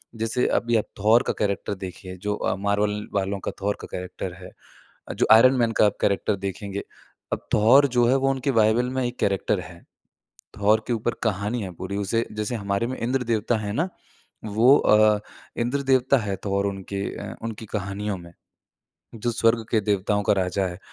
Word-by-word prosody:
जैसे 115 +2 -1
अभी 120 0 +1
आप 110 - +3 0.2
थॉर 110 +4 +5
का - - -1
कैरेक्टर 100 0 -1
देखिए 95 0 -8
जो 105 0 -2 0.3
Marvel 100 +1 +1 0.2
वालों 100 0 -1
का - - -4
थॉर 100 +1 -1
का - - -8
कैरेक्टर 90 0 -5
है। 90 0 -11 0.6
अ, - - -4
जो - - +1
आयरन 130 +4 +7
मैन 115 -2 +2
का 105 - +4
आप 105 - 0
कैरेक्टर 100 +1 +1
देखेंगे। 100 +1 -5 0.5
अब - - -3
थॉर 130 +7 +6
जो 120 -1 +5
है 130 - +4
वो 135 0 +1
उनके 135 +1 -1
बाइबल 115 +1 +3
में 130 0 -1
एक 120 +1 -6
कैरेक्टर 100 -2 0
है। - - -12 0.8
थॉर 105 +2 +3
के 120 - 0
ऊपर 115 +1 -1
कहानी 105 +2 -1
है 95 - -5
पूरी। 95 +3 -5
उसे 110 +3 0
जैसे 105 +2 -3
हमारे 100 +1 -1
में 130 - -4
इंद्र 125 +2 0
देवता 115 0 0
है 105 -1 -4
ना 165 +9 0 0.6
वो 110 +6 +5
अ, 105 0 +4 0.4
इंद्र 125 +4 0
देवता 130 0 +3
है 105 -5 -2
थोर 100 0 0
उनके 100 0 -4 0.4
उनकी 115 -1 -6
कहानियों 100 -1 -3
में, 85 -1 -12 0.8
जो 120 +2 -2
स्वर्ग 115 0 +2
के 110 - +3
देवताओं 105 0 0
का - - +3
राजा 95 0 0
है। 90 -1 -7
105 Hz, 185 wpm, -24 LUFS, 100-120 Hz, 0.8 s, आयरन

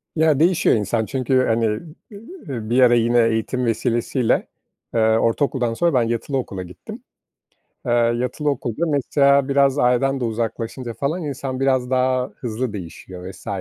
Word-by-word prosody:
Ya 155 -3 +3
değişiyor 170 +2 +3
insan 110 +1 -1
çünkü, 130 +1 +1
hani, 115 0 +1 0.5
eee, 200 - -10 0.5
bir 120 +2 +2
ara 125 -1 +6
yine 120 +1 +3
eğitim 115 +3 -1
vesilesiyle, 115 +2 0 0.5
eee, 115 - +1
ortaokuldan 115 +2 +1
sonra 170 +6 +1
ben 125 -3 +3
yatılı 120 +4 -2
okula 95 -7 -4
gittim. 90 0 -11 0.8
Eee, - - -1
yatılı 120 +5 0
okulda 140 +3 -2
mesela 140 -1 +2
biraz 140 0 +3
aileden 130 +2 +2
de 125 - -3
uzaklaşınca 115 +2 -4
falan 155 +8 -2
insan 135 -2 -4
biraz 130 -2 +1
daha 130 0 +1
hızlı 120 -1 -4
değişiyor 90 0 -8
vs. 95 - -16
125 Hz, 145 wpm, -21 LUFS, 115-135 Hz, 0.8 s, ara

